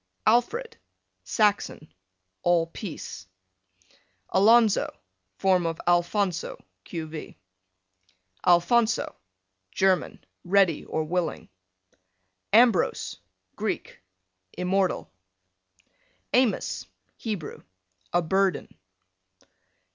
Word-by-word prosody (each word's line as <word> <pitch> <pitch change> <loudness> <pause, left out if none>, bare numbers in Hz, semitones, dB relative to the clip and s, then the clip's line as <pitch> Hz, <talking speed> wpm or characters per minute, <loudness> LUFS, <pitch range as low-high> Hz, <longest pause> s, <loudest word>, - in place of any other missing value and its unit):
Alfred, 450 - +1 0.5
Saxon, 205 -7 0 0.5
all 175 -1 +3
peace. 165 - -8 1.0
Alonzo, 220 +2 +4 0.5
form 185 -3 +2
of 165 0 -3
Alphonso, 175 +1 +1 0.3
q. 165 -2 -5
v. 155 -1 -9 1.1
Alphonso. 220 +7 +3 0.6
German, 190 - +1 0.2
ready 185 -3 +3
or 160 - -2
willing. 175 +2 -2 1.0
Ambrose, 225 -4 +3 0.4
Greek, - - -4 0.5
immortal. 185 - -1 1.2
Amos, 250 -3 +1 0.3
Hebrew, 205 -9 -5 0.5
a 175 - +2
burden. 190 +2 0
190 Hz, 65 wpm, -26 LUFS, 175-215 Hz, 1.2 s, Alonzo